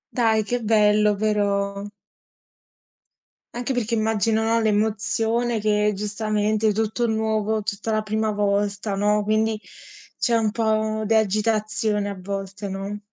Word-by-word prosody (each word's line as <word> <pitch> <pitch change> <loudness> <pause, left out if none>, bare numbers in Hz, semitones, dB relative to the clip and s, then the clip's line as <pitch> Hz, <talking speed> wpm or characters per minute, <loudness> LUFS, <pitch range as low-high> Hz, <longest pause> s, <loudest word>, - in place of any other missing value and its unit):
Dai, 225 -3 +3
che 245 +4 -2
bello, 210 -1 +3
però. 200 -1 0 1.7
Anche 245 +2 -3
perché 235 -2 -2
immagino, 220 0 +1
no, 225 +1 +2
l'emozione 220 +2 0
che 210 0 +2
giustamente 215 +1 0
è - - +3
tutto 220 +3 -1
nuovo, 220 -1 0
tutta 210 +1 -3
la 215 0 +1
prima 215 0 -1
volta, 200 0 -1
no. 210 +1 +2
Quindi 215 +1 0 0.6
c'è 235 - +1
un 220 -2 +2
po' 220 -1 0
di 220 - +1
agitazione 215 -1 +1
a 200 - -6
volte, 195 +1 -5
no? 195 +2 -5
215 Hz, 130 wpm, -23 LUFS, 205-220 Hz, 1.7 s, Dai